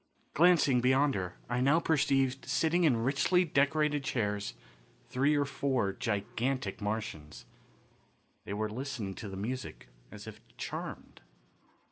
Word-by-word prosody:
Glancing 155 Hz, -7 st, +5 dB
beyond 135 Hz, +3 st, +3 dB
her, 90 Hz, -4 st, -3 dB
I 120 Hz, +1 st, -1 dB
now 140 Hz, +5 st, +4 dB
perceived 135 Hz, -4 st, +1 dB
sitting 170 Hz, +2 st, +2 dB
in 120 Hz, -7 st, +3 dB
richly 145 Hz, +8 st, +3 dB
decorated 150 Hz, 0 st, +2 dB
chairs 105 Hz, -7 st, -2 dB, 0.5 s
three 140 Hz, +4 st, +2 dB
or 145 Hz, -1 st, +2 dB
four 130 Hz, -7 st, 0 dB
gigantic 115 Hz, 0 st, -2 dB
Martians. 105 Hz, -, -4 dB, 1.0 s
They -, -, -5 dB
were 110 Hz, +1 st, -1 dB
listening 125 Hz, -5 st, -4 dB
to 105 Hz, -, -6 dB
the 95 Hz, -, -7 dB
music 120 Hz, -, -5 dB, 0.2 s
as -, -, -10 dB
if -, -, -10 dB, 0.2 s
charmed. -, -, -6 dB
130 Hz, 125 wpm, -31 LUFS, 110-145 Hz, 1.0 s, Glancing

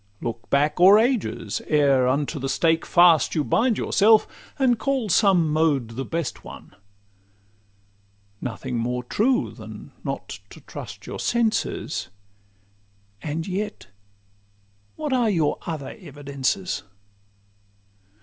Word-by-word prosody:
Look 115 Hz, -2 st, -6 dB
back 150 Hz, +3 st, +1 dB
o'er 190 Hz, +4 st, +8 dB
ages, 220 Hz, -, 0 dB
ere 140 Hz, -4 st, +3 dB
unto 145 Hz, +3 st, -1 dB
the 135 Hz, 0 st, -3 dB
stake 160 Hz, +4 st, +1 dB
fast 170 Hz, -4 st, +5 dB
You 155 Hz, -, +1 dB
bind 225 Hz, -, +2 dB
yourself, 215 Hz, +1 st, +4 dB, 0.3 s
and 250 Hz, -4 st, +2 dB
call 265 Hz, -4 st, -1 dB
some 180 Hz, -4 st, +4 dB
mode 150 Hz, -7 st, +1 dB
the 120 Hz, +4 st, -5 dB
best 165 Hz, 0 st, -4 dB
one. -, -, -12 dB, 1.7 s
Nothing 125 Hz, +1 st, -4 dB
more 125 Hz, +2 st, -2 dB
true 245 Hz, -, +1 dB
than -, -, -11 dB
not -, -, -5 dB
to -, -, -13 dB
trust -, -, -9 dB
your -, -, -6 dB
senses; 235 Hz, -, -1 dB, 1.1 s
And 160 Hz, +2 st, -3 dB
yet 200 Hz, -, -4 dB, 1.1 s
what 300 Hz, -3 st, -3 dB
are 245 Hz, -3 st, +2 dB
your 165 Hz, -7 st, +1 dB
other 155 Hz, -5 st, -5 dB
evidences? 145 Hz, +2 st, -3 dB
165 Hz, 115 wpm, -24 LUFS, 140-215 Hz, 1.7 s, o'er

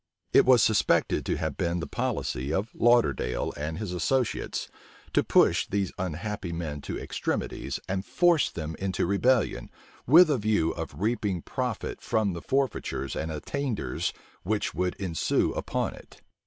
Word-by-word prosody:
It -, -, +7 dB
was 125 Hz, -3 st, +7 dB
suspected 110 Hz, -2 st, +2 dB
to -, -, 0 dB
have -, -, -2 dB
been 85 Hz, 0 st, 0 dB
the 85 Hz, -, -3 dB
policy 65 Hz, +4 st, -2 dB
of 100 Hz, +7 st, -1 dB
Lauderdale 115 Hz, -, +2 dB
and 75 Hz, +2 st, -4 dB
his 100 Hz, -3 st, -4 dB
associates 125 Hz, +8 st, -1 dB, 0.5 s
to -, -, +4 dB
push -, -, +4 dB
these 100 Hz, -2 st, -1 dB
unhappy 90 Hz, +2 st, -3 dB
men 80 Hz, -4 st, -4 dB
to -, -, -5 dB
extremities, -, -, -3 dB
and 95 Hz, 0 st, -2 dB
force 170 Hz, -, +3 dB
them 80 Hz, -1 st, -5 dB
into 95 Hz, -1 st, -1 dB
rebellion, 110 Hz, +6 st, +1 dB, 0.4 s
with 160 Hz, +5 st, +8 dB
a 135 Hz, -, +1 dB
view 105 Hz, -6 st, +2 dB
of 70 Hz, -, -6 dB
reaping 105 Hz, -4 st, -1 dB
profit 125 Hz, -5 st, -3 dB
from 105 Hz, -4 st, 0 dB
the 85 Hz, -, -6 dB
forfeitures 130 Hz, -, -1 dB
and 80 Hz, +1 st, -3 dB
attainders 110 Hz, -, -2 dB, 0.3 s
which 105 Hz, +3 st, -1 dB
would 90 Hz, 0 st, -1 dB
ensue 90 Hz, -5 st, 0 dB
upon -, -, -2 dB
it. -, -, -15 dB
95 Hz, 150 wpm, -27 LUFS, 80-120 Hz, 0.5 s, with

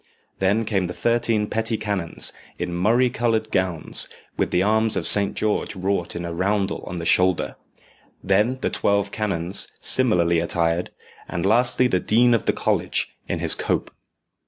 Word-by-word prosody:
Then 100 Hz, +4 st, +1 dB
came 95 Hz, -4 st, 0 dB
the 90 Hz, -, -7 dB
thirteen 115 Hz, -2 st, +1 dB
petty 110 Hz, +1 st, -2 dB
canons, 100 Hz, -6 st, -1 dB, 0.2 s
in 90 Hz, -, -4 dB
murrey 115 Hz, +8 st, +2 dB
coloured 110 Hz, -2 st, 0 dB
gowns, 90 Hz, -4 st, -1 dB, 0.3 s
with -, -, 0 dB
the 90 Hz, -, +1 dB
arms 110 Hz, +1 st, +2 dB
of -, -, -2 dB
Saint 100 Hz, -1 st, +2 dB
George 105 Hz, 0 st, -1 dB
wrought 95 Hz, -2 st, -2 dB
in 85 Hz, 0 st, -4 dB
a 85 Hz, -, -4 dB
roundel 100 Hz, +3 st, -1 dB
on 90 Hz, -, -5 dB
the 85 Hz, -1 st, -4 dB
shoulder; 90 Hz, 0 st, +2 dB, 0.7 s
then 105 Hz, +7 st, +2 dB
the -, -, -1 dB
twelve 100 Hz, 0 st, 0 dB
canons, 95 Hz, -3 st, +1 dB
similarly 85 Hz, -10 st, +3 dB
attired; 85 Hz, +1 st, 0 dB, 0.4 s
and 85 Hz, +1 st, -3 dB
lastly 120 Hz, +4 st, +3 dB
the 95 Hz, -7 st, +2 dB
dean 120 Hz, +5 st, +3 dB
of 115 Hz, -, 0 dB
the -, -, +5 dB
college, -, -, -1 dB
in -, -, -1 dB
his -, -, +4 dB
cope. -, -, -2 dB
100 Hz, 160 wpm, -23 LUFS, 90-110 Hz, 0.7 s, the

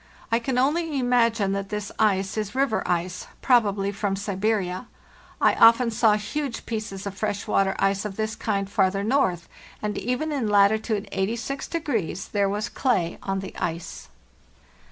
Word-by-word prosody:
I 230 Hz, -, +3 dB
can 250 Hz, +1 st, -2 dB
only 300 Hz, +3 st, +1 dB
imagine 235 Hz, -5 st, +2 dB
that 195 Hz, 0 st, -3 dB
this 210 Hz, -1 st, -4 dB
ice 195 Hz, -3 st, +2 dB
is 215 Hz, +1 st, -3 dB
river 265 Hz, -4 st, +1 dB
ice, 180 Hz, +1 st, -2 dB, 0.2 s
probably 205 Hz, -6 st, +3 dB
from 200 Hz, -1 st, -1 dB
Siberia. 200 Hz, 0 st, -1 dB, 0.5 s
I -, -, +4 dB
often 230 Hz, +1 st, +6 dB
saw 220 Hz, -1 st, +4 dB
huge 235 Hz, +5 st, -3 dB
pieces 215 Hz, -4 st, -5 dB
of 200 Hz, -1 st, -5 dB
fresh 205 Hz, -1 st, -2 dB
water 195 Hz, 0 st, +1 dB
ice 195 Hz, 0 st, +1 dB
of 210 Hz, -2 st, -5 dB
this 220 Hz, +1 st, -2 dB
kind 200 Hz, -3 st, -1 dB
farther 195 Hz, 0 st, +1 dB
north, 195 Hz, -8 st, +1 dB, 0.3 s
and 210 Hz, -1 st, -3 dB
even 250 Hz, +7 st, -2 dB
in 270 Hz, -7 st, -1 dB
latitude 205 Hz, +1 st, +3 dB
86 230 Hz, +8 st, -2 dB, 0.6 s
there 200 Hz, -1 st, +2 dB
was 210 Hz, +3 st, -2 dB
clay 185 Hz, -11 st, 0 dB
on 195 Hz, 0 st, -2 dB
the 195 Hz, -, -8 dB
ice. 165 Hz, 0 st, -4 dB
210 Hz, 155 wpm, -25 LUFS, 195-235 Hz, 0.6 s, often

